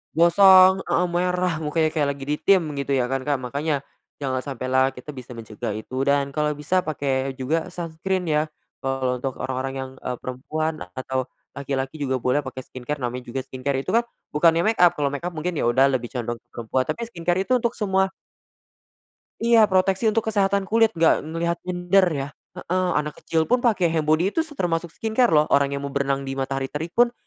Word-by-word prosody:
Gosong 185 +2 +7
heeh, 180 - +2
merah 180 -1 0
mukanya 155 +1 +1
kayak 150 -3 +1
lagi 135 - -9
ditim, 185 +5 +3 0.2
gitu 140 0 -3
ya 125 -1 0
kan, 135 0 0
Kak. 145 - +2
Makanya, 140 +2 -2 0.4
jangan 130 -2 -1
sampai 130 -2 -5
lah 130 0 +4
kita 125 +4 -8
bisa 125 -2 -10
mencegah 110 -2 -5
itu, 110 +4 -7
dan 140 -1 +2
kalo 150 0 0
bisa 180 +5 +1
pake 135 -3 -2
juga 155 +5 -1
sunscreen 175 +2 -3
ya, 150 -1 +2 0.4
kalo 130 -2 -1
untuk 130 0 -3
orang-orang 130 +1 -3
yang, 130 0 -4
eee, 125 - -4
perempuan, 155 +5 -3 0.2
atau 130 0 -2 0.3
laki-laki 135 +1 -3
juga 135 -3 -1
boleh 125 +3 +2
pake 130 0 -6
skincare. 130 +3 -6
Namanya 125 +1 -3
juga 135 - -1
skincare 130 +1 -3
itu 185 - -7
kan, 235 +1 +3 0.3
bukannya 165 +3 +4
makeup, 175 -4 +5
kalau 145 -1 0
makeup 170 +5 -4
mungkin, 175 +3 -2
ya - - 0
udah 130 +3 +4
lebih 125 -2 -1
condong 120 -1 -3
ke - - -53
perempuan. 120 +3 -1
Tapi 235 - -3
skincare 175 -2 -1
itu 255 - -9
untuk 235 0 -1
semua 190 -3 +1 1.3
Iya 230 -2 +5
proteksi 190 +3 +2
untuk 225 +1 0
kesehatan 200 -2 +1
kulit, 225 +2 +4
enggak 165 - +4
ngelihat 170 +2 -2
gender 180 +1 +2
ya 140 -3 -3 0.3
heeh. 185 +1 -1
Anak 150 0 -3
kecil 160 -1 0
pun 250 0 +2
pake 215 -7 +2
handbody 160 +3 +2
itu 325 - +2
se 315 -3 -8
termasuk 170 -1 -1
skincare 225 +6 +1
loh. 150 -1 +4
Orang 140 0 +4
yang 140 0 -4
mau 140 - -6
berenang 140 0 0
di 135 - -3
matahari 135 0 -2
terik 160 +3 -3
pun, 240 0 +5
150 Hz, 190 wpm, -23 LUFS, 135-180 Hz, 1.3 s, Gosong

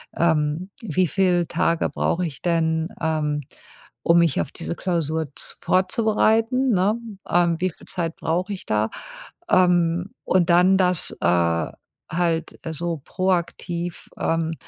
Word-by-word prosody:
ähm, 160 +1 +1
wie 185 -4 +1
viel 180 0 +2
Tage 165 0 +1
brauche 180 +1 0
ich 155 -5 -7
denn, 160 -1 +1
ähm, 155 -2 0 0.6
um 170 +1 +5
mich 165 -5 +2
auf - - -5
diese - - -4
Klausur 160 -4 -1
z - - -6
vorzubereiten“, 225 +6 +2
ne? 200 +1 +2 0.3
Ähm, 170 -1 +2
wie 185 - +1
viel - - -18
Zeit 170 -3 -2
brauche 180 +5 -1
ich 190 - -8
da? 110 +1 +1 0.6
Ähm, 175 0 +3
und 180 -2 +2
dann 180 +2 +5
das, 180 -3 +2
äh, 85 -2 +2 0.4
halt 165 -1 -1
so 170 +1 -3
proaktiv, 175 -2 -2
ähm, 165 0 0
170 Hz, 130 wpm, -23 LUFS, 160-185 Hz, 0.6 s, um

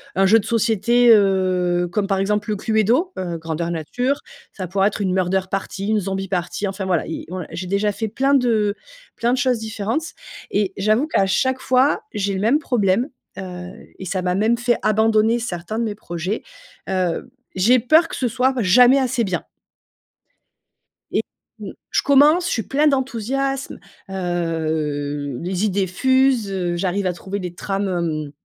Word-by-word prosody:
un 195 0 +3
jeu 225 +3 +6
de - - -6
société, 235 +1 +2
heu, 185 -3 +2
comme 200 +2 0
par 195 -1 0
exemple 210 +2 -1
le 210 - -1
Cluedo, 225 - +1
heu, 175 -2 -3
grandeur 165 +1 -3
nature, 245 - -1 0.3
ça 185 -2 -5
pourrait 195 +2 +2
être 210 - -6
une 185 -2 0
murder 190 0 +1
party, 195 0 -4
une 215 0 +2
zombie 195 0 -3
party, 180 +2 -2
enfin 190 0 -4
voilà, 180 -4 0
i 165 - -5
ouais, 180 -3 -5
j'ai 180 +1 -5
déjà 200 +2 +1
fait 220 +2 -3
plein 270 +5 +1
de 220 -5 +2 0.4
plein 235 +1 0
de - - +1
choses 250 -1 +2
différentes 220 +8 -3 0.4
et 200 -2 0
j'avoue 215 +9 +2
qu'à 195 -11 +2
chaque 260 +7 +1
fois 260 +3 +2
j'ai 200 -2 -1
le 190 - -2
même 250 +8 +3
problème, 235 -1 +1 0.3
heu 180 -1 -7 0.3
et 190 - -8
ça 185 +1 -2
m'a 180 0 0
même 220 +4 +2
fait 240 -1 +1
abandonner 220 +2 +3
certains 215 -1 -4
de - - 0
mes 210 -2 -3
projets, 180 +1 -4 0.5
heu, 185 +5 -1 0.2
j'ai 230 +7 +4
peur 315 +8 +4
que - - -6
ce 250 - 0
soit 255 +3 +1
jamais 245 +7 +6
assez 255 -2 0
bien 185 -4 -2 1.7
et - - +1 0.4
mmh, - - -7 0.2
je - - +2
commence, 295 +5 +5
je - - -2
suis 225 - -1
plein 290 +7 +1
d'enthousiasme, 270 0 -1 0.3
heu, 155 -6 -2
les 185 +3 -1
idées 195 -2 0
fusent, 260 +2 +2
heu, 180 -2 -1
j'arrive 190 +2 -1
à 180 - 0
trouver 190 +3 -5
les 180 -2 -5
trames, 195 +2 -2
hem, 160 -5 -2
200 Hz, 175 wpm, -21 LUFS, 185-240 Hz, 1.7 s, jeu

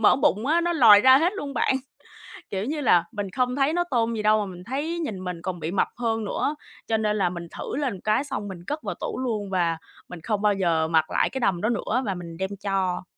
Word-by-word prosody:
mỡ 225 - +5
bụng 215 -2 +1
á, 325 +4 +3
nó 345 0 0
lòi 225 -10 +8
ra 260 +3 +7
hết 345 +4 +2
luôn 285 -9 -6
bạn. 265 - +2 0.7
Kiểu 195 +2 -3
như 295 +2 -2
là, 175 -9 +4
mình 205 -1 -4
không 250 +2 0
thấy 280 +3 +2
nó 350 - +2
tôn 230 -2 +1
gì 220 - -2
đâu 215 0 +4
mà 205 - -1
mình 180 -2 -9
thấy 295 +7 -3
nhìn 210 - -4
mình 180 -2 -5
còn 180 0 -4
bị 160 - -3
mập 195 - +1
hơn 225 -2 -1
nữa, 285 +8 -1 0.3
cho 225 - +1
nên 215 -1 0
là 180 -3 +2
mình 175 -1 -7
thử - - -5
lên 280 -3 0
một 185 - -10
cái 215 +6 +1
xong 270 -7 -5
mình 190 -2 -7
cất 300 +1 -3
vào - - -3
tủ 485 - -5
luôn 220 -6 -2
và 175 -3 0 0.3
mình 175 -2 -9
không 210 +2 -2
bao 210 -1 +3
giờ 165 -4 +1
mặc 160 -1 +2
lại - - +2
cái 265 - -4
đầm 190 -8 +1
đó 215 - +1
nữa, 240 +2 0
và 195 - -1
mình 170 -2 -8
đem 190 0 -2
cho. 190 -3 -1
215 Hz, 265 wpm, -25 LUFS, 185-265 Hz, 0.7 s, lòi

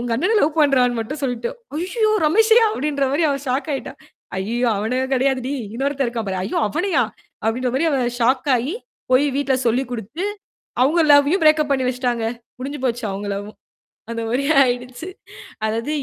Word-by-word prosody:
உங்க 240 0 -4
அண்ணனை 365 - +1
லவ் 310 +2 +1
பண்றான்னு 255 -4 +3
மட்டும் 280 +7 -5
சொல்லிட்டோம். 245 -3 -2 0.3
"ஐயய்யோ! 430 +4 0 0.2
ரமேஷையா?" 445 +7 +5
அப்படீன்ற 285 -4 -1
மாரி 300 - +1
அவ 280 - 0
ஷாக் 265 +5 -1
ஆயிட்டா. 275 - -4 0.5
"ஐயய்யோ! 235 +6 -1
அவனைக் 255 +5 -1
கெடையாதுடி. 260 0 0 0.2
இன்னொருத்தன் 275 +1 -1
இருக்கான் 230 -3 -4
பாரு", 190 - -2
"ஐயோ 195 - -2
அவனையா?" 300 - +1 0.4
அப்படின்ற 245 +3 0
மாரி 330 - +1
அவ 275 - +1 0.2
ஷாக் 255 +4 +2
ஆயி, 265 - -2 0.4
போய் 260 +3 +5
வீட்டுல 275 -2 +1
சொல்லிக் 250 +2 +1
குடுத்து, 240 - -5 0.6
அவுங்க 310 +6 +3
லவ்வையும் 290 +5 +4
பிரேக் 305 0 +6
அப் 285 - -10
பண்ணி 260 -2 0
வச்சுட்டாங்க. 245 -2 -1 0.3
முடிஞ்சு 280 +3 -5
போச்சு 240 -2 -1
அவுங்க 200 +1 -5
லவ்வும். 205 +2 -7 0.6
அந்த 230 0 -3
மாரி 265 +4 0 0.2
ஆயிடுச்சு. 250 +7 -4 0.6
அதாவது 230 +6 -2
260 Hz, 165 wpm, -21 LUFS, 240-295 Hz, 0.6 s, பிரேக்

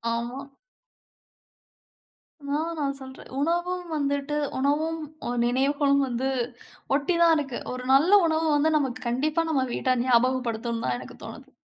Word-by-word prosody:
ஆமா. 250 +4 -5 2.0
நான் 315 +4 -1
நான் 280 -2 0
சொல்றேன். 265 0 -11
உணவும் 345 +3 -1
வந்துட்டு 285 0 -1 0.2
உணவும், 305 +4 0 0.3
அ - - -2 0.2
நினைவுகளும் 280 +3 +2
வந்து 250 +1 -2 0.7
ஒட்டி 290 +5 +1
தான் 335 -1 +6
இருக்கு. 270 -4 -3
ஒரு 255 0 -6
நல்ல 295 +7 +5 0.2
உணவு 320 0 +1
வந்து 300 +2 +3
நமக்கு 260 -3 -2
கண்டிப்பா 300 +7 +1
நம்ம 265 -4 +1
வீட்டார் 255 -2 +1
ஞாபகப்படுத்தணும்னு 235 -2 +1
தான் 125 - 0
எனக்கு - - -10
தோணுது. - - -10
280 Hz, 130 wpm, -26 LUFS, 255-310 Hz, 2.0 s, தான்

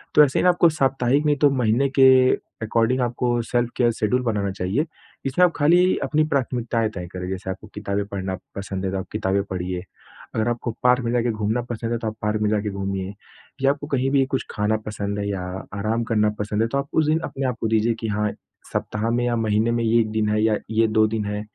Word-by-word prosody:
तो 150 - +9
ऐसे 135 - +2
ही - - +1
ना 180 - +6
आपको 175 -1 +5
साप्ताहिक 135 -1 +1
नहीं 150 -1 +3
तो 145 0 +5
महीने 125 +3 +2
के 135 - +8 0.6
अकॉर्डिंग 115 +3 +1
आपको 120 0 0
सेल्फ 120 +1 0
केयर 120 -1 +3
शेड्यूल 125 +4 +1
बनाना 105 -4 -1
चाहिए। 95 - -1 0.4
इसमें 180 +7 +4
आप 175 - +2
खाली 175 +5 +4
अपनी 155 0 +2
प्राथमिकताएँ 120 -4 0
तय 90 -1 -5
करें, 90 0 -5
जैसे 95 0 -5
आपको 105 +3 -6
किताबें 100 -1 -2
पढ़ना 95 -2 -3 0.2
पसंद 95 -1 -4
है, 95 - -1
तो 95 - -2
आप 95 - -5
किताबें 100 -2 0
पढ़िए, 90 -1 -3 0.5
अगर 110 +1 +1
आपको 120 0 -2
पार्क 125 0 +4
में 115 - 0
जाके 120 -1 +1
घूमना 110 +2 -1
पसंद 115 0 -3
है, 120 - +1
तो 115 - -4
आप 110 - -3
पार्क 105 0 0
में 105 - +2
जाके 105 0 0
घूमिए। 95 0 -3 0.5
या 135 0 +4
आपको 145 0 -5
कहीं 135 -2 0
भी 135 -1 +3
कुछ - - -2
खाना 105 +1 0
पसंद 100 -1 -3
है 100 - -2
या 95 -2 -2 0.4
आराम 110 +3 0
करना 105 -1 +3
पसंद 105 +1 -1
है, 115 - +2
तो 140 - -2
आप 140 0 -2
उस 160 - +3
दिन 155 +1 +3
अपने 135 0 -4
आप 125 -2 -2
को 110 - +1
दीजिए 110 +1 +2
कि 115 - -3
हाँ, 105 0 0 0.4
सप्ताह 110 +2 -2
में 120 +1 +1
या 120 -1 +1
महीने 110 0 +1
में 115 0 0
ये 115 +1 +3
1 110 -1 +1
दिन 110 -1 0
है 105 0 +1
या 110 -1 +3 0.2
ये 110 0 +3
2 110 0 +3
दिन 110 -1 -2
है, 105 0 -3
110 Hz, 235 wpm, -23 LUFS, 105-125 Hz, 0.6 s, तो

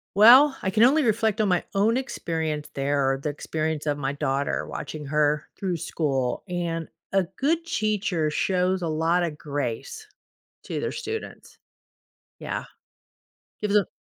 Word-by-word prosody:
Well, 255 +7 +8
I 190 - 0
can 215 +4 +2
only 285 +3 +5
reflect 220 -1 +1
on 210 - +3
my 180 -1 +1
own 215 +4 +3
experience 160 - -3
there 140 -1 +1
or 135 - -2
the 145 +2 -3
experience 155 +1 -3
of 145 -1 0
my 135 0 -1
daughter 140 -1 -1
watching 155 -1 -6
her 150 0 +1
through 185 -3 -1
school, 135 -6 -1
and 170 -2 -3 0.2
a 195 -2 +3
good 330 +4 +1
teacher 205 - 0
shows 185 +3 +1
a 170 - -1
lot 165 +3 +1
of 160 -3 -3
grace 145 - -4 0.6
to - - -4
their - - -2
students. 445 0 -6 0.8
Yeah. - - -4 1.0
Gives 210 -1 0
them 205 -4 +4
170 Hz, 150 wpm, -25 LUFS, 150-210 Hz, 1.0 s, Well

